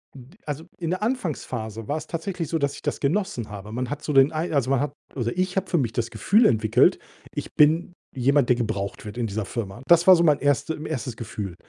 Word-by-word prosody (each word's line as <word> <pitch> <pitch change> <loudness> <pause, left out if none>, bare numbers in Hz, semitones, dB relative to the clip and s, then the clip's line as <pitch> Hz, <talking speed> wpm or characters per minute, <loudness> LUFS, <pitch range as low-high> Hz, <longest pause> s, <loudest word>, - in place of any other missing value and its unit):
N 125 -2 -12
d 195 - -21
also, 150 +2 -5
in 165 -3 -3
der 185 - -2
Anfangsphase 125 - -3
war's 155 +2 -2
tatsächlich 170 -1 -4
so, 165 - 0
dass 140 -2 0
ich - - -10
das - - -2
genossen 150 - -1
habe. 105 +1 -8
Man 125 +1 -3
hat 145 +2 -5
so - - -2
den 135 +1 +6
Ei 160 +3 -2
also, 135 -3 +1
man 135 - +3
hat 145 -1 -2 0.2
oder 120 +5 -2
ich 185 0 0
habe 190 -1 -1
für 175 - +2
mich 120 -7 0
das 115 -1 -1
Gefühl 220 +4 +3
entwickelt: 110 - +4 0.3
„Ich - - -6
bin 160 +4 +4 0.2
jemand, 135 +1 +2
der 125 - +4
gebraucht 110 -3 -3
wird 105 +2 -8
in 120 -2 -1
dieser 105 0 -3
Firma.“ 115 +1 -5
Das 170 +1 +5
war 185 - +10
so 170 - +3
mein 150 -3 +4
erste 145 +3 +1
1. 125 -6 -4
Gefühl. 105 -6 -6
140 Hz, 235 wpm, -24 LUFS, 115-165 Hz, 0.3 s, war